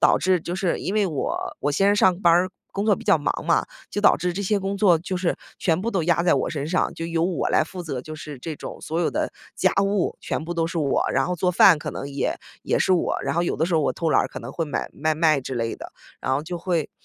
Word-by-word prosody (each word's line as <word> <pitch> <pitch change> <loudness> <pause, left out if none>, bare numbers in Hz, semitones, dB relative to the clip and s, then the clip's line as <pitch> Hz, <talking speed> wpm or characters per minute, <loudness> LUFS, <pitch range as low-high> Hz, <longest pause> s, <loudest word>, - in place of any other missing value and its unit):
导 - - +5
致 185 0 +2
就 175 - -4
是 185 -2 0
因 190 - -3
为 210 -2 +3
我 155 -6 -2 0.2
我 145 - 0
先 195 +7 +3
生 205 - +3
上 185 -2 +3
班 175 - +5
儿， 180 +2 +3 0.2
工 200 - -2
作 215 -2 +4
比 - - -10
较 - - +5
忙 145 - -2
嘛， - - +3 0.3
就 - - -4
导 205 - +6
致 180 +1 -1
这 200 - -2
些 205 +1 +1
工 195 +1 -2
作 190 -5 +4
就 185 +3 -4
是 180 -1 0 0.2
全 165 -1 +1
部 225 +4 -2
都 190 -6 0
压 170 +1 +2
在 175 - +4
我 - - 0
身 145 -1 -3
上， 185 +3 +1
就 165 - -5
由 165 0 0
我 180 -1 0
来 - - +3
负 180 +2 -8
责， 135 -7 -4
就 155 +3 -8
是 150 -2 -8
这 155 +5 -5
种 - - -8
所 165 +2 -2
有 - - +1
的 - - -2 0.2
家 - - +2
务 200 -2 0
全 - - -3
部 170 - -4
都 165 -1 0
是 170 - -5
我， 145 -4 +1
然 - - +2
后 180 - -1
做 180 +1 +1
饭 180 -1 +6
可 - - -5
能 140 - -6
也 140 0 -1 0.3
也 - - +1
是 - - +2
我， 180 - +1
然 - - -1
后 170 - +2
有 175 - -1
的 160 - +1
时 175 0 -1
候 160 - +4
我 145 - +1
偷 165 -2 -1
懒 - - +4
儿， - - -2
可 - - -7
能 - - -8
会 165 - -2
买 145 - -3
外 155 0 +2
卖 155 -2 +3
之 130 0 -5
类 115 -1 -2
的， - - -10 0.3
然 130 - 0
后 140 - -1
就 175 +2 -5
会 170 -3 -1
170 Hz, 315 characters per minute, -24 LUFS, 155-185 Hz, 0.3 s, 导